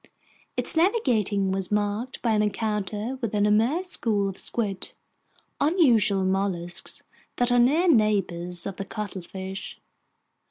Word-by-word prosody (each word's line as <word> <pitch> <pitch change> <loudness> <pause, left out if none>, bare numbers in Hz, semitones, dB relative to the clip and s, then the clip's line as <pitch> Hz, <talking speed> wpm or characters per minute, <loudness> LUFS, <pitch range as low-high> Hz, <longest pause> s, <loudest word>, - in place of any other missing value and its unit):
Its - - +3
navigating 230 - +1
was 190 0 -2
marked 210 +4 -2
by 235 - +2
an 215 -1 +2
encounter 210 +3 -2
with 225 -3 -2
an 205 0 +2
immense 235 - +2
school 205 - +2
of 195 - -5
squid, 205 -4 -2 0.7
unusual 240 - +3
mollusks 185 -2 -2 0.3
that 245 0 +1
are 245 - +4
near 300 +9 +3
neighbors 195 - +2
of 195 -2 -5
the 195 - -4
cuttlefish. 190 -1 -7
210 Hz, 125 wpm, -25 LUFS, 195-240 Hz, 0.7 s, are